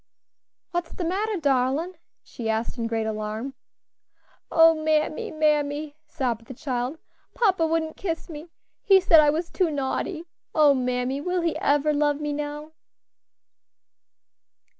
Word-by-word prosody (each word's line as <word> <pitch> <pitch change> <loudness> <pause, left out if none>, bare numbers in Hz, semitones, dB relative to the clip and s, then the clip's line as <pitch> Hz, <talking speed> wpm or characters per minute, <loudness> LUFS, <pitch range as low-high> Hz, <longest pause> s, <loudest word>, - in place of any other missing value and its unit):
"What's 345 -1 -3
de 360 - -4
matter, 405 +4 -1
darlin'?" 280 +3 +1 0.3
she 225 -2 -6
asked 220 +1 -1
in 230 -2 -2
great 225 -1 -1
alarm. 215 +4 -4 1.0
"O 325 0 +6
mammy, 310 -1 0
mammy!" 300 -1 0
sobbed 235 -5 -3
the 260 - -9
child, 255 +3 -3 0.4
"papa 380 -8 +2
wouldn't 320 -1 -1
kiss 330 -4 -4
me! 320 0 -9 0.3
he 390 -1 +6
said 340 -3 +6
I 300 -1 +5
was 325 +3 -2
too 365 -3 +1
naughty. 300 +4 -2 0.3
O 300 -3 +6
mammy! 250 +1 -1
will 360 +3 -1
he 335 -1 0
ever 290 +1 +2
love 295 0 +1
me 295 -1 -2
now?" 295 +1 -5
300 Hz, 135 wpm, -25 LUFS, 260-325 Hz, 1.0 s, O